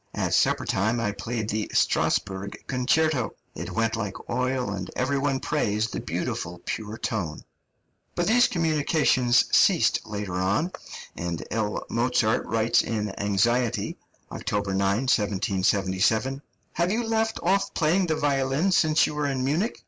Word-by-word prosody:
At - - -1
supper - - +2
time 110 +5 0
I 105 -3 0
played 110 0 -4
the 110 0 -2
Strasburg 100 0 0
Concerto. 135 +1 +1 0.2
It - - -6
went 115 0 0
like 105 -4 -5
oil, 125 -3 -1
and 95 -2 -5
every 140 +2 0
one 135 -1 0
praised 105 -2 -1
the - - -2
beautiful, 85 0 -4
pure 110 0 -4
tone." 95 - -3 0.7
But 175 - 0
these 245 +5 +5
communications 150 -7 +2
ceased - - +4
later 105 -3 -5
on, 105 - +1 0.4
and 85 -1 -4
L. 110 -2 -2
Mozart 115 -2 +1
writes 115 0 +2
in 105 -3 -3
anxiety 115 +4 +1 0.4
(October 100 -1 -2
9, 100 +3 +1
1777): 105 +2 +1 0.3
"Have 170 +1 +1
you 235 +3 0
left 225 0 0
off 195 +3 +1
practising 175 +3 +2
the 160 - +1
violin 140 +4 +1
since 155 -3 +4
you - - -3
were 150 -1 -1
in 135 -2 -1
Munich? 170 - 0
120 Hz, 140 wpm, -25 LUFS, 105-150 Hz, 0.7 s, these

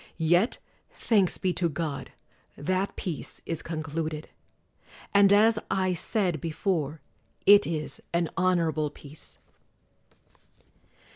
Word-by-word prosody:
Yet, 175 +7 +2 0.3
thanks 200 -6 +2
be 185 -1 0
to 175 -1 +1
God, 150 -2 -4 0.5
that 185 +6 -1
peace 170 -6 -5
is 165 -2 -2
concluded; 155 -1 -4 0.8
and 200 -1 +6
as 220 +2 +5
I 185 -1 +1
said 180 - 0
before, 160 -3 -2 0.4
it 205 0 +7
is 155 -2 -2
an 170 0 +1
honorable 165 -5 +1
peace. 145 +1 -9
170 Hz, 100 wpm, -27 LUFS, 155-190 Hz, 0.8 s, it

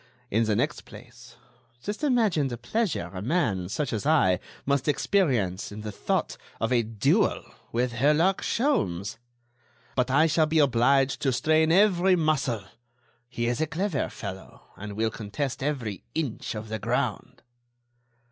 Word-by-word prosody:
In 115 +2 +2
the 110 -1 +1
next 145 +7 -1
place, 120 +2 -14 0.5
just 210 +8 -5
imagine 220 - +2
the 120 -2 -5
pleasure 165 - -2
a 90 - -5
man, 105 - 0
such 140 +4 -2
as 110 - -2
I, 140 - +3 0.3
must 140 0 0
experience 130 - +1
in 105 +1 -7
the 105 0 -5
thought - - -2 0.2
of 115 - -1
a 120 - +4
duel 110 -2 +1 0.3
with 120 +1 0
Herlock 150 +10 +2
Sholmes. 105 - 0 0.8
But 125 -1 +1
I 140 +5 +4
shall 155 0 +3
be 160 +1 0
obliged 135 -1 +3
to 135 - +2
strain 155 +5 +2
every 190 -1 +4
muscle; 140 - 0 0.7
he 120 -1 -3
is 120 +4 0
a 160 - +1
clever 170 -1 -1
fellow, 95 -2 -8
and 105 +1 -7
will 110 +2 0
contest 120 +7 -4
every 130 -8 -3
inch 145 -8 -3
of 110 0 -6
the 110 0 -3
ground." 120 -1 -2
130 Hz, 150 wpm, -26 LUFS, 110-155 Hz, 0.8 s, a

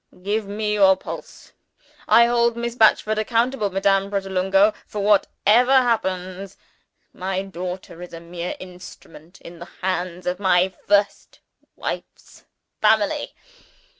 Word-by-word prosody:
Give 205 +1 -1
me 210 +1 -2
your 195 -2 +5
pulse. - - -10 0.6
I 235 - +6
hold 235 0 +1
Miss 235 0 -3
Batchford 215 -2 +3
accountable, 230 0 0
Madame 195 +1 +1
Pratolungo, 195 +1 +2
for 205 -1 -4
whatever 210 +4 +3
happens 195 -7 0 0.6
my 190 +1 -3
daughter 180 -2 -7
is 180 - -9
a 165 - -8
mere 170 +1 -6
instrument 180 -2 -13
in 170 0 -12
the 175 - -9 0.2
hands 180 -1 -3
of 180 +1 -2
my 185 -1 +2
first 205 0 0 0.4
wife's - - -7 0.4
family. 215 -1 +1
195 Hz, 120 wpm, -22 LUFS, 185-215 Hz, 0.6 s, I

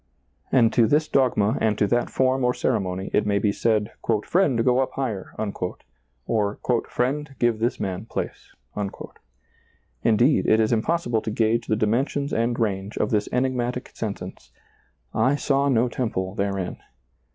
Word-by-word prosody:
And 115 -3 +4
to 115 -3 +4
this 155 +4 +2
dogma 125 -5 +2
and 110 -2 +2
to - - +3
that 120 +4 +1
form 130 0 +1
or 125 0 +2
ceremony 95 -5 -1
it 105 - +3
may 100 -1 +2
be 100 0 +2
said, 105 0 0 0.2
" 110 -2 +2
Friend, 140 -11 +2
go 125 0 +4
up 130 - 0
higher," 115 -8 -4 0.9
or 105 -2 0
" 115 - -1
Friend, 135 +3 -1
give 120 -2 +1
this 120 +2 0
man 95 +1 -3
place." - - -5 1.5
Indeed, 120 +6 +3
it 110 - +4
is 110 +1 +2
impossible 120 -1 0
to 110 - -4
gauge 115 +2 +1
the 110 - +2
dimensions 130 +7 0
and 115 +2 0
range 100 -2 -2
of 105 - 0
this 105 -2 +1
enigmatic 125 -1 -1
sentence, 105 -3 -6 0.3
" - - -43 0.2
I 140 - +2
saw 140 -1 +1
no 125 -2 +3
temple 105 -6 -2
therein." 100 -2 -2
115 Hz, 160 wpm, -24 LUFS, 105-130 Hz, 1.5 s, And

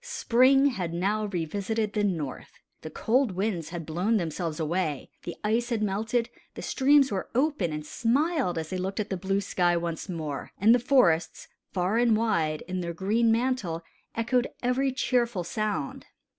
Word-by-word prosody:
Spring 270 - +4
had 175 -9 -3
now 205 +5 0
revisited 205 +4 -2
the 210 - 0
North. 165 -9 -3 0.3
The 155 - -7
cold 240 - +1
winds 185 -4 -2
had 175 -1 -5
all 155 - -8
blown 200 +7 +2
themselves 165 -2 -3
away, 160 -2 -2
the 175 - -6
ice 230 +3 +1
had 225 -3 0
melted, 220 +4 0 0.3
the - - -7
streams 275 0 +4
were 190 -2 -3
open 265 - +1
and 150 0 -5
smiled 260 - 0
as 160 -1 -4
they 185 - -2
looked 190 +3 -3
at 210 -1 -3
the - - +1
blue 195 +2 0
sky 175 -3 +1
once 170 +2 -4
more; 155 -5 -5
and 220 +4 +5
the 245 - +4
forests, 230 - +2 0.2
far 190 +4 +1
and 235 -3 +4
wide, 165 -9 0
in 185 0 -3
their 170 -1 -4
green 220 +6 +2
mantle, 225 -9 0 0.3
echoed 240 +2 +1 0.2
every 260 +2 +1
cheerful 240 -6 0
sound. 205 -4 -3
200 Hz, 170 wpm, -27 LUFS, 170-235 Hz, 0.3 s, and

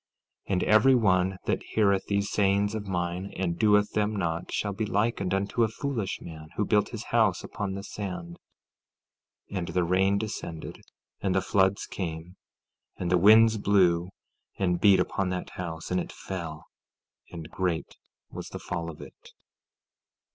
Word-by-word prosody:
14:26 - - -1
And 90 - +1
every 110 +5 +5
one 95 -4 +2
that - - 0
heareth 100 -3 +1
these 100 0 0
sayings 100 +1 +2
of 105 -2 -4
mine 90 +1 -2
and 85 -2 -2
doeth 105 -1 +4
them 105 0 0
not 85 -3 -2
shall 100 -1 -1
be 110 +2 -2
likened 100 -3 0
unto 100 +4 0
a 115 - +5
foolish 110 -3 -3
man, 80 -2 -9
who 105 - 0
built 105 0 +2
his 115 -1 -6
house 110 -7 +3
upon 100 -1 -4
the 100 - -6
sand— 90 -5 -6 1.1
14:27 100 - -3
And 85 - -4
the 90 +2 0
rain 95 +3 +2
descended, 100 -6 -5 0.4
and 95 -2 0
the 95 - +3
floods 95 0 +2
came, 85 -1 -6 0.6
and 90 -1 -2
the 90 - +4
winds 110 +3 +6
blew, 90 -4 +3 0.5
and 90 -3 0
beat 100 -3 +6
upon 95 -1 0
that 90 0 -4
house; 80 -2 -6
and 90 - +2
it - - -7
fell, 85 -5 -6 0.6
and 85 -3 -9
great 90 -3 -2 0.4
was - - -7
the - - -6
fall 85 0 -4
of 80 - -10
it. - - -14
95 Hz, 165 wpm, -27 LUFS, 90-105 Hz, 1.1 s, winds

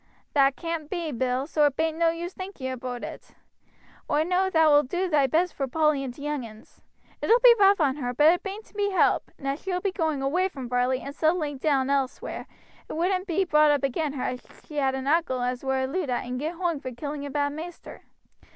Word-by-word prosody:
"That 275 -1 +4
caan't 330 -3 -4
be, 340 -4 -3
Bill, 255 +1 -1
so 300 -1 +3
it 280 - -3
bain't 320 0 -1
no 335 -1 +4
use 340 +2 -4
thinking 370 -9 -6
aboot 250 -1 -5
it. - - -9 0.7
Oi 300 - +2
know 365 +3 +1
thou 320 -3 +4
wilt 290 -2 +5
do 365 +3 0
thy 295 -5 +3
best 335 +6 +1
vor 275 - -2
Polly 305 0 +1
and 260 - -4
t' 280 +4 -11
young 295 -3 -2
uns. 215 -1 -14 0.4
It - - -2
'ull 460 - +7
be - - +10
rough 395 -1 +6
on 285 -3 +2
her, 245 -4 -2
but 300 +6 +5
it 355 - -2
bain't 405 +2 -6
to - - -23
be 405 -1 0
helped; 380 - +2
and 275 - -7
as 275 +2 -2
she 380 - -4
will 360 - 0
be 395 +1 -1
going 315 -7 -1
away 355 +8 +1
from 265 -8 -7
Varley 250 +1 +1
and 280 - -7
settling 310 -3 0
elsewhere, 275 -2 0 0.4
it - - -5
wouldn't 365 +3 0
be 375 +2 +1
brought 305 -3 +4
up 290 -2 +2
again 280 +2 -1
her 270 - -4
as 250 - -3 0.2
she 300 - -9
had 265 -2 +1
an 265 0 -4
uncle 290 -3 +1
as 250 +1 -2
were 265 0 0
a - - +1
Luddite 270 -4 -2
and 250 0 -4
got 315 +5 -3
hoong 335 -4 -1
for 255 - -5
killing 285 +4 -5
a 285 - -5
bad 285 +1 -1
maister. 330 +3 -9
295 Hz, 235 wpm, -26 LUFS, 265-340 Hz, 0.7 s, be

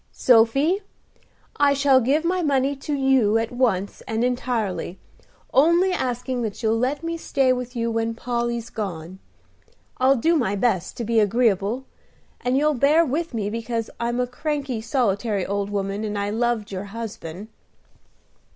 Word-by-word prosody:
"Sophy, 275 - +3 0.8
I 285 -1 +4
shall 275 -1 +4
give 285 +7 +1
my 365 +1 +1
money 280 -2 +1
to 285 +2 -4
you 265 -6 +3
at 225 0 -2
once 225 -6 0
and 225 +1 -1
entirely, 235 -7 -2 0.6
only 340 +7 +4
asking 250 -3 -2
that 220 0 -4
you'll 225 +1 +2
let 275 +5 -1
me 335 0 -3
stay 270 -5 +1
with 250 0 -5
you 230 -1 -1
when 225 0 -1
Polly's 235 -1 -3
gone. 185 -3 -5 0.8
I'll 260 +2 +5
do 325 +7 +2
my 230 -10 +1
best 195 -4 0
to 235 - -3
be 230 0 +2
agreeable, 220 +2 +1 0.6
and 250 +1 +1
you'll 300 +2 +3
bear 295 +5 +4
with 310 0 -2
me 210 -2 -2
because 230 0 -3
I'm 240 +1 -1
a 250 - +2
cranky, 270 -1 -3
solitary 220 -5 0
old 200 0 -2
woman, 200 +1 -2
and 210 -1 -3
I 200 0 -1
loved 230 -2 -1
your 190 +1 -4
husband." 205 -3 -7
240 Hz, 155 wpm, -23 LUFS, 215-270 Hz, 0.8 s, I'll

